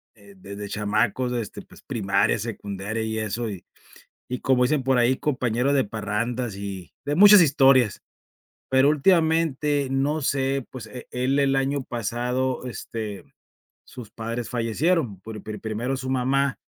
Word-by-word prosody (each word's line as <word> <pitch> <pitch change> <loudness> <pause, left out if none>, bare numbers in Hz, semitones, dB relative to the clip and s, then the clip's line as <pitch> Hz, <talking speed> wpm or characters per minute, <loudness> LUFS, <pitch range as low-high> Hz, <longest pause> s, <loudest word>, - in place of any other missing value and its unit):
eh, 100 -2 -17
desde 100 +2 -8
chamacos, 110 +5 0
este, 115 -4 -4
pues, - - -18
primaria, 100 0 +1
secundaria 105 0 -4
y 110 0 -2
eso 110 +1 -3
y 95 -3 -8 0.6
y 125 - -4
como 130 -2 +2
dicen 145 +2 +2
por 130 0 +2
ahí, 120 +2 +3
compañero 125 -1 0
de 135 -2 +3
parrandas 110 +2 -3
y 100 -3 -7
de 145 +1 -1
muchas 205 +3 +9
historias, 135 -6 +4 0.7
pero 130 +2 +4
últimamente, 155 -3 +2
no 140 +4 0
sé, 135 -1 0
pues, 125 -4 -8
eh, 120 +3 -10
él 130 +3 0
el 135 -1 +2
año 135 +1 0
pasado, 125 +3 -2
este, 110 -4 -6 0.6
sus 120 -4 -11
padres 115 +1 -5
fallecieron 120 - 0
por 105 +1 -8
pri 110 0 -6
primero 115 +4 -3
su 130 0 -5
mamá 135 +1 +1
125 Hz, 145 wpm, -24 LUFS, 110-135 Hz, 0.7 s, muchas